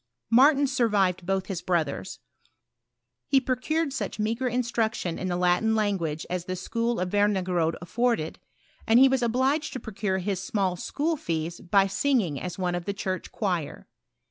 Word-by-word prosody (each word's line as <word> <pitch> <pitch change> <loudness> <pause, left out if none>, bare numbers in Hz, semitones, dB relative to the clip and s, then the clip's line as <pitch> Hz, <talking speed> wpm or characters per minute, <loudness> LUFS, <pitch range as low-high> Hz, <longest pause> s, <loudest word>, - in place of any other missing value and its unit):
Martin 280 +4 +6
survived 205 -9 +1
both 190 -1 0
his 185 -2 -4
brothers. 155 - -1 1.1
He 270 - +4
procured 275 +5 -1
euch 315 - -4
meagre 225 +4 -1
tustruction 230 -7 -1
in 185 - -3
the 175 - -1
Latin 180 +5 +2
language 185 -8 -1
as 180 -1 -3
the 185 - -3
school 230 +5 -2
of 180 0 -2
Wemigerode 185 -5 +1
afforded, 230 -4 -1 0.5
and 225 +1 +5
he 270 - +8
was 265 -1 +1
obliged 265 +6 +1
to 260 - -4
procure 200 -4 -2
his 190 0 -2
small 190 -2 0
school 305 - -1
fees 165 - -3
by 195 +2 +3
singing 195 - 0
as 180 -1 -5
one 180 -2 -1
of 175 -1 -3
the 200 - -3
church 185 -1 -4
choir. 180 -8 -3
200 Hz, 160 wpm, -26 LUFS, 180-240 Hz, 1.1 s, he